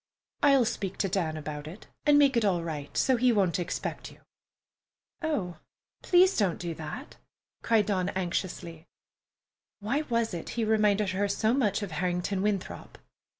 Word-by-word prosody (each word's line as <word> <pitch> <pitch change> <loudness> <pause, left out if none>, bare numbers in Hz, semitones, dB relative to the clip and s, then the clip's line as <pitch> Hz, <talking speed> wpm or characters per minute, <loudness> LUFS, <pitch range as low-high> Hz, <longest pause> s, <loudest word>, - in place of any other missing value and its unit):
"I'll 275 -4 +5
speak 195 -3 -3
to 195 - 0
Dan 170 -4 -1
about 150 -1 -6
it 175 +7 -10 0.2
and 295 0 +6
make 280 -3 +5
it 235 - +2
all 180 -5 +1
right, 150 -4 -5
so 260 -2 +3
he 250 +1 +4
won't 190 -6 +2
expect 175 -1 -4
you." - - -16 1.0
"Oh, 205 - -2 0.4
please 370 +2 +4
don't 195 -6 +1
do 170 -1 -4
that!" 160 - -8 0.4
cried 220 -3 +3
Dawn 190 -3 0
anxiously. 175 -3 -4 0.9
(Why 235 +8 -1
was 230 -3 0
it 170 - -5
he 230 - +1
reminded 210 -2 +2
her 200 +2 0
so 215 +3 +1
much 215 -6 +1
of 195 - -5
Harrington 180 +3 -1
Winthrop?) 200 -2 -3
200 Hz, 155 wpm, -28 LUFS, 175-230 Hz, 1.0 s, and